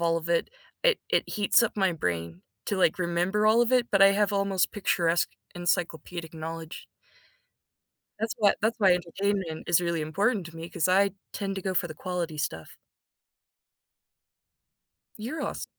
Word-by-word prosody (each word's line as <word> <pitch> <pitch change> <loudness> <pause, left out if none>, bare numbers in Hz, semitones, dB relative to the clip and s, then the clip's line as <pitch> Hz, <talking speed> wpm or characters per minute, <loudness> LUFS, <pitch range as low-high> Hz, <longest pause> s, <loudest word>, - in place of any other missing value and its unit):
all 165 -1 +2
of 165 +1 -8
it. 170 -1 +1 0.3
It - - +4
it 460 - +2
heats 210 +2 +3
up 230 - -1
my 190 -3 +2
brain 85 - -3 0.2
to, 200 - -1
like, 185 -2 +2
remember 180 +4 +1
all 225 +2 +5
of 240 +2 0
it, 245 -2 +4
but 195 -1 +4
I 195 - +9
have 205 +1 +2
almost 195 -2 +1
picturesque, 175 -4 +1 0.2
encyclopedic 170 -1 -2
knowledge. 160 0 -7 1.3
That's 225 0 -2
why 205 -2 +4
that's 225 +2 0
why 195 -4 +5
entertainment 180 -1 -2
is 175 0 +4
really 170 -2 -1
important 195 +5 0
to 165 -1 -12
me 165 +1 -7
'cause 175 0 0
I 195 +2 +4 0.2
tend 195 -2 -3
to 190 - -4
go 190 0 -2
for 175 0 +1
the 155 - -8
quality 170 -2 -4
stuff. 80 - -4 2.4
You're 245 +9 -5
awes - - -4
180 Hz, 165 wpm, -27 LUFS, 165-200 Hz, 2.4 s, I